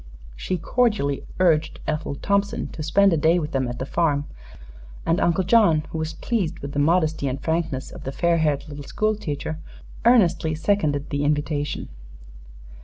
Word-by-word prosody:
She 185 - -2
cordially 185 - 0
urged 160 -4 +2
Ethel 155 -2 -2
Thompson 200 +6 0
to 160 - -8
spend 195 +4 +4
a - - +2
day 160 +3 +3
with 155 -2 -3
them 130 -3 0
at 120 0 -5
the 130 - -3
farm, 145 -2 0 0.8
and 165 - +1
Uncle 170 +2 +2
John, 185 -6 +4
who 160 - -3
was 160 0 -3
pleased 215 -9 -2
with 140 - -7
the 145 - -2
modesty 155 -1 +2
and 130 +1 -2
frankness 160 -5 -2
of - - -10
the 135 - -4
fair 170 +3 +1
haired 150 -1 0
little 145 -1 -8
school 215 +8 0
teacher, 155 -4 -4 0.4
earnestly 185 -9 +4
seconded 155 -5 0
the 145 0 -1
invitation. 145 0 -1
160 Hz, 170 wpm, -23 LUFS, 145-180 Hz, 0.8 s, spend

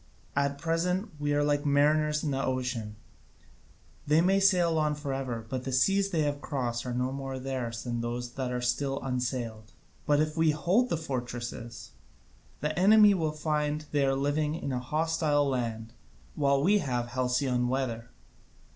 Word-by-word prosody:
At 140 0 +1
present 180 +6 -1
we 145 0 -1
are 145 0 +2
like 145 0 +1
mariners 150 +1 +2
on 150 - -1
the 135 0 -1
ocean: 125 -5 -2 1.1
they 150 +2 +4
may 190 +3 +3
sail 175 -4 +3
on 150 -1 +1
for 145 -2 -4
ever, 125 -4 -4
but 130 +1 -4
the 135 - -4
seas 195 +10 +3
they 165 -5 +1
have 145 -1 -2
crossed 125 -5 -3
are 125 - -2
no 125 +1 0
more 135 -1 -5
theirs 130 -3 -4
than 120 -1 -3
those 120 +1 -4
that 130 -1 -3
are 125 0 -2
still 135 +2 0
unsailed. 120 -4 -3 0.3
But 145 0 +4
if 155 0 0
we 160 -1 +3
hold 180 +11 +2
the 170 - 0
fortresses, 120 -5 -5 0.7
the 150 +2 -1
enemy 210 +2 +7
will 160 -5 0
find 150 0 -1
they 145 -1 +2
are 135 0 +2
living 145 +2 0
in 140 - -4
a 125 - -1
hostile 150 +1 +1
land, 115 -4 -3 0.4
while 140 -1 +2
we 205 +5 +4
have 125 -6 -2
halcyon 125 0 0
weather. 120 -3 -2
140 Hz, 170 wpm, -29 LUFS, 125-155 Hz, 1.1 s, enemy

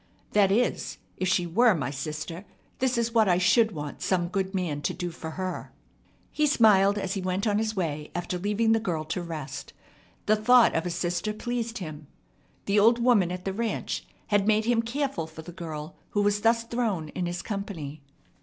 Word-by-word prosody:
That 200 -2 +4
is, 240 +5 0 0.2
if 185 - -1
she 180 -1 +2
were 220 +5 +4
my 135 -4 -2
sister, 155 +5 -5 0.4
this 255 -2 +1
is 235 0 0
what 220 -4 +4
I 175 - +4
should 195 +5 +4
want 150 -5 -6
some 175 -2 +1
good 190 +1 -2
man 165 -6 -1
to - - -2
do 175 -1 -4
for 160 -1 -7
her." 185 -1 -4 0.6
He 300 0 +2
smiled 205 -7 +5
as 195 -2 -2
he 195 - -2
went 185 +2 -1
on 210 -1 +2
his 220 0 -1
way 155 -5 -2
after 175 +1 -2
leaving 210 +4 +1
the 225 - +4
girl 175 -8 -2
to 160 +3 -3
rest. 160 -5 -6 0.5
The 215 - +4
thought 235 +2 +5
of 165 +2 0
a - - -2
sister 175 +4 -1
pleased 235 +1 -3
him. 155 -5 -7 0.6
The 200 +1 +3
old 230 +3 +6
woman 235 -7 +3
at 180 0 -6
the 195 - -1
ranch 225 +2 -2 0.3
had 205 -1 +2
made 215 0 +3
him 235 -1 +3
careful 270 - -2
for 160 0 -10
the 175 - -9
girl 160 -2 -7
who 205 - +1
was 205 0 +2
thus 230 +1 +3
thrown 225 -9 -2
in 175 +3 -3
his 175 0 -4
company. 170 -9 -5
195 Hz, 200 wpm, -27 LUFS, 170-225 Hz, 0.6 s, old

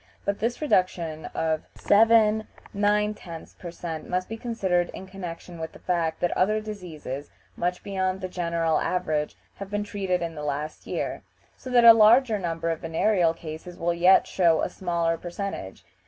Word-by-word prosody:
but 200 0 -1
this 240 +6 -2
reduction 170 - 0
of 160 -1 0
7 220 0 +4 0.3
9/10 205 -4 -1
per 175 - -7
cent, 165 -2 -6
must 185 0 -1
be 225 - -5
considered 190 -7 0
in 190 - -8
connection 180 -2 -8
with 160 0 -5
the - - -12
fact 165 -3 0
that 175 - +1
other 215 +4 +2
diseases, 170 -10 -7 0.3
much 180 - -2
beyond 190 -1 -1
the 185 - -4
general 170 -3 0
average, 155 -5 -1 0.2
have 200 -1 -7
been 205 0 -1
treated 190 -4 -2
in 165 -1 -4
the 150 - -7
last 150 +1 -4
year, - - -3 0.3
so 255 - -10
that 245 -2 +5
a 230 - +12
larger 225 +1 +5
number 165 -2 -2
of 165 - -3
venereal 165 +1 +2
cases 165 +2 -8
will 170 0 0
yet 180 +3 +5
show 170 -4 +2
a - - -1
smaller 170 -2 -1
percentage. 175 - -6
180 Hz, 170 wpm, -26 LUFS, 165-205 Hz, 0.3 s, a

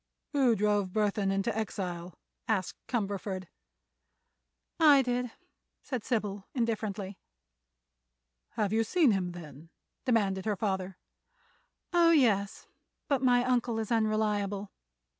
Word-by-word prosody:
"Who 265 -5 +3
drove 205 -2 +1
Burthon 205 -1 +1
into 195 +3 0
exile?" 180 -5 -4 0.3
asked 200 -5 0
Cumberford. 200 -4 -2 1.3
"I 290 -4 +7
did," 245 0 -1 0.5
said 255 -5 -4
Sybil, 205 -4 -2
indifferently. 210 -5 -2 1.3
"Have 210 -1 0
you 225 +1 +3
seen 290 +3 +3
him, 180 -3 -1
then?" 160 -2 -11 0.4
demanded 200 -7 +1
her 215 -2 +1
father. 190 -2 -2 1.0
"Oh, 340 -1 +5
yes; 220 -11 +2 0.4
but 280 -4 +1
my 245 -2 +4
uncle 245 -2 +1
is 220 0 -3
unreliable. 210 -3 0
210 Hz, 105 wpm, -30 LUFS, 195-240 Hz, 1.3 s, I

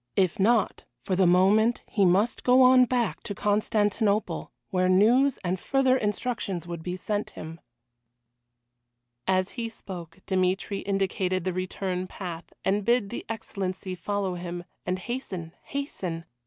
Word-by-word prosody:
If 185 -2 +2
not, 220 +2 +2 0.2
for 185 - 0
the 185 -1 +4
moment 205 +6 +4
he 200 -3 +2
must 195 +6 +2
go 255 +1 +6
on 255 0 +7
back 245 -2 0
to 205 - -5
Constantinople, 210 0 +1 0.2
where 185 -1 +2
news 235 +9 +4
and 180 +1 -1
further 265 +2 +2
instructions 210 -5 -2
would 170 -1 -6
be 180 +2 -4
sent 205 +3 -2
him. 160 +1 -7 1.7
As 185 0 +2
he 235 -2 -4
spoke 175 -6 -9
Dmitry 190 +1 0
indicated 190 -2 0
the 185 0 -1
return 185 0 -3
path, 175 -3 -7
and 200 +2 +2
bid 235 -2 +2
the - - -4
Excellency 190 -4 -4
follow 195 +1 -2
him, 175 0 -5 0.2
and 180 +1 0
hasten, 185 -6 -5
hasten. 185 - -4
195 Hz, 140 wpm, -27 LUFS, 185-220 Hz, 1.7 s, on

